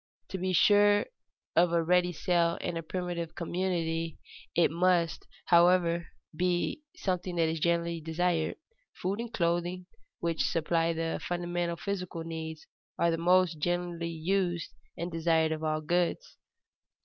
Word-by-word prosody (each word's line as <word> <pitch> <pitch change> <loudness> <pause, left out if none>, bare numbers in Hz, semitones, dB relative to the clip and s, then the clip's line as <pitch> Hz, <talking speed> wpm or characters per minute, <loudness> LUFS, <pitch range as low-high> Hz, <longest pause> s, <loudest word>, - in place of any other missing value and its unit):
To 190 - -4
be 185 +1 -1
sure 205 +3 +5 0.5
of 170 0 +4
a 170 -1 +2
ready 180 +1 +3
sale 170 0 +1
in 175 - -3
a 165 - -2
primitive 170 -1 -4
community 165 -2 -2 0.4
it 170 - +4
must, 170 -1 +1 0.2
however, 170 -1 +4 0.3
be 180 - 0
something 180 -1 -2
that 165 -1 +2
is 160 0 -2
generally 170 0 0
desired. 165 0 0 0.4
Food 195 +4 -2
and 235 0 -4
clothing, 175 0 -1 0.3
which 165 -1 -1
supply 165 +1 +1
the 165 0 -2
fundamental 175 -1 -2
physical 180 -4 -4
needs, 160 -1 -6 0.3
are 170 - +3
the 165 - -1
most 175 -1 +3
generally 175 0 -1
used 175 0 -1 0.2
and 170 +1 -4
desired 160 -1 +2
of 160 0 -3
all 155 0 0
goods. 175 - -1
170 Hz, 135 wpm, -30 LUFS, 165-180 Hz, 0.5 s, sure